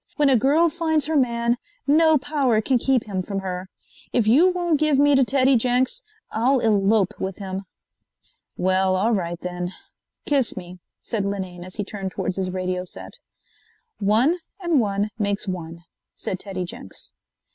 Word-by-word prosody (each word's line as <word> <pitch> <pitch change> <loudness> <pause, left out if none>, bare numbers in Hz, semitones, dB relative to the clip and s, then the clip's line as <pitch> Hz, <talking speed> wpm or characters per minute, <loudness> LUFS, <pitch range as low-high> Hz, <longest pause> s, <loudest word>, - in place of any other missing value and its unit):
"When 295 -2 +3
a 265 - +5
girl 285 +8 +4
finds 320 -2 0
her 315 +1 -1
man, 235 -3 +2 0.3
no 315 +2 +5
power 275 -5 +1
can 250 +3 +1
keep 260 -1 +2
him 195 -3 -3
from 195 +1 -4
her. 185 0 -5 0.4
If 240 -4 +2
you 285 +12 +6
won't 350 -4 0
give 305 -2 +3
me 290 +1 +5
to 270 -1 +5
Teddy 265 +1 +3
Jenks, 250 - +1 0.3
I'll 255 +5 +2
elope 210 -3 +2
with 190 -1 -3
him." 195 -1 -5 0.9
"Well, 185 +1 +2
all 205 +5 +2
right 175 -5 -1
then. 180 0 -4 0.5
Kiss 275 -8 +1
me," 180 0 -8 0.2
said 220 -4 -2
Linane 190 -3 -4
as 185 0 -9
he 205 - -2
turned 195 -1 -5
towards 185 - -3
his 190 -1 -1
radio 185 0 -2
set. 185 - -9 0.8
"One 225 - +3 0.2
and 345 -6 +2
one 205 -1 0
makes 205 0 0
one," 170 -2 -5 0.3
said 185 - -4
Teddy 190 -3 -4
Jenks. 95 - -8
215 Hz, 165 wpm, -23 LUFS, 185-275 Hz, 0.9 s, you